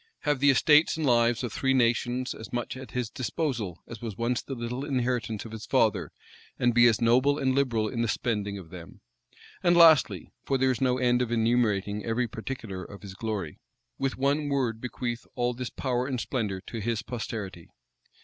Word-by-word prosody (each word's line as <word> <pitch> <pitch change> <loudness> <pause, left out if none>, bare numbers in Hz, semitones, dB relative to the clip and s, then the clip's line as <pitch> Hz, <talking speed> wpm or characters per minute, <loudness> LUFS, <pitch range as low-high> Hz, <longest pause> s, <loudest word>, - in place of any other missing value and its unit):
Have 145 -2 0
the 145 +1 +5
estates 150 +4 +5
and 160 - -1
lives 120 -1 +3
of 120 - -4
three 135 0 +1
nations 125 +1 +1
as 110 - -10
much 120 0 -3
at 130 -2 -9
his 125 0 -2
disposal 120 - -3
as 115 -2 -10
was 110 -5 -6
once 120 +1 0
the 135 - -6
little 120 +2 -4
inheritance 125 -6 -1
of 110 - -9
his 110 -1 -8
father, - - +2 0.5
and 120 -1 +2
be 120 0 +7
as 115 -2 +3
noble 130 +5 +4
and 130 -2 +1
liberal 120 -6 +1
in 115 +2 -3
the 115 - +1
spending 105 -3 -1
of 85 -4 -11
them? 85 -3 -11 0.6
And 175 0 +4
lastly, 150 - +5
(for 135 - 0
there 130 0 +3
is 125 - -3
no 125 -1 +2
end 125 -1 +2
of 120 -2 -1
enumerating 110 -3 +1
every 120 +2 0
particular 110 -5 -6
of 100 +2 -11
his 100 -2 -8
glory,) 100 -6 -4 0.4
with 135 -1 -1
one 145 +2 +1
word 125 -5 -1
bequeath 120 -1 -4
all 125 0 0
this 125 0 -5
power 125 -1 -2
and 130 -3 -2
splendor 105 -7 -2
to 115 - -7
his 110 0 -2
posterity? 100 -7 -6
120 Hz, 195 wpm, -27 LUFS, 110-130 Hz, 0.6 s, be